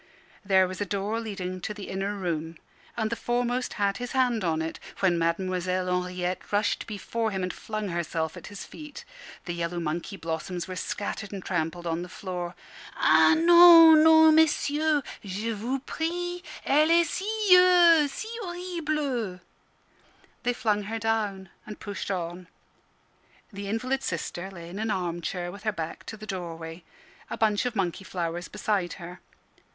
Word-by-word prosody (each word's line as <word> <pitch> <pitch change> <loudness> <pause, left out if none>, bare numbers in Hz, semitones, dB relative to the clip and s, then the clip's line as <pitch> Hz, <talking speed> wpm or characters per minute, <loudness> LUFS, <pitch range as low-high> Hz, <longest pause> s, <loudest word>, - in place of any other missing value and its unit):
There 190 -2 +4
was 185 +2 -7
a - - +1
door 205 +3 -2
leading 185 -5 -5
to 210 - -4
the 200 -2 -8
inner 195 +2 -2
room, 165 -4 -3 0.4
and 220 -1 -1
the - - 0
foremost 245 +1 -1
had 200 -1 0
his 245 0 -5
hand 250 -5 +2
on 160 -2 0
it, 160 0 -4 0.2
when 185 -3 +3
Mademoiselle 185 +2 0
Henriette 180 0 -2
rushed 205 +1 0
before 225 +2 -2
him, 190 -3 -3
and 180 - -2
flung 215 -2 -4
herself 165 -1 -2
at 180 - -10
his 205 -1 -8
feet. 300 -1 -10 0.4
The 175 - -3
yellow 170 0 -3
monkey 170 +5 -3
blossoms 170 +2 -4
were 185 - -6
scattered 200 +1 -4
and 195 -2 -7
trampled 175 -1 -2
on 165 0 -1
the 180 - -7
floor. 180 -2 -5 0.4
"Ah 320 - +5
non, 335 -2 +9
non, 320 0 +7
messieurs! 305 -1 +3 0.2
Je 205 +3 -3
vous 230 +5 -2
prie 350 +2 -3 0.2
Elle 300 +3 +4
est 340 0 +5
si 360 -6 +5
si 435 - -6
horrible!" 305 - -3 1.0
They 245 - +1
flung 210 -3 0
her 225 +2 -3
down, 210 -4 -1 0.2
and 215 - -8
pushed 200 -1 -5
on. 175 -1 -4 1.1
The 200 0 -6
invalid 255 +6 -1
sister 175 0 -4
lay 170 -3 -10
in 185 +4 -7
an 220 +1 -1
arm 175 -4 -2
chair 175 +1 -3
with 200 - -11
her 215 0 0
back 165 -5 -6
to 220 - -6
the 215 - -9
doorway, 170 -3 -6 0.5
a - - -4
bunch 215 +2 +2
of 245 - -4
monkey 190 -1 -1
flowers 175 -1 -4
beside 195 -5 -1
her. 175 0 -9
200 Hz, 160 wpm, -27 LUFS, 180-250 Hz, 1.1 s, non